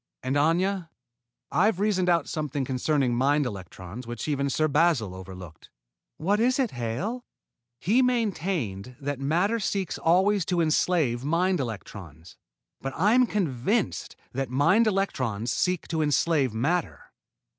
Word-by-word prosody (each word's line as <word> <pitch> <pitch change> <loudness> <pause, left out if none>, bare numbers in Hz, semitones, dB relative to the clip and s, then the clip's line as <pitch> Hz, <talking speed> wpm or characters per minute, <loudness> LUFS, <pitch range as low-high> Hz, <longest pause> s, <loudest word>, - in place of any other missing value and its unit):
"And, 130 +2 -1
Aña, 170 +4 +1 0.6
I've 205 0 +2
reasoned 195 -3 +1
out 170 -4 +2
something 145 -4 -2
concerning 130 0 0
mind 140 +4 +2
electrons 95 +2 -7
which 120 +4 -5
even 140 -2 0
Sir 155 +4 +1
Basil 145 - +2
overlooked." 95 -3 -10 0.5
"What 200 +6 +1
is 250 +3 +3
it, 260 -5 +1
Hale?" 125 - -3 0.6
"He 220 +9 +3
maintained 180 - -1
that 145 -1 -3
matter 175 +11 +1
seeks 195 -3 -2
always 190 +4 +3
to 180 -2 0
enslave 155 -6 +1
mind 175 +5 +1
electrons, 95 - -7 0.5
but 135 +1 -4
I 200 +7 +3
am 250 0 +5
convinced 190 - -1 0.2
that 135 -1 -2
mind 165 - +3
electrons 130 - -1
seek 180 -1 0
to 160 -2 0
enslave 145 -2 +2
matter. 145 +10 -2
155 Hz, 135 wpm, -26 LUFS, 125-190 Hz, 0.6 s, am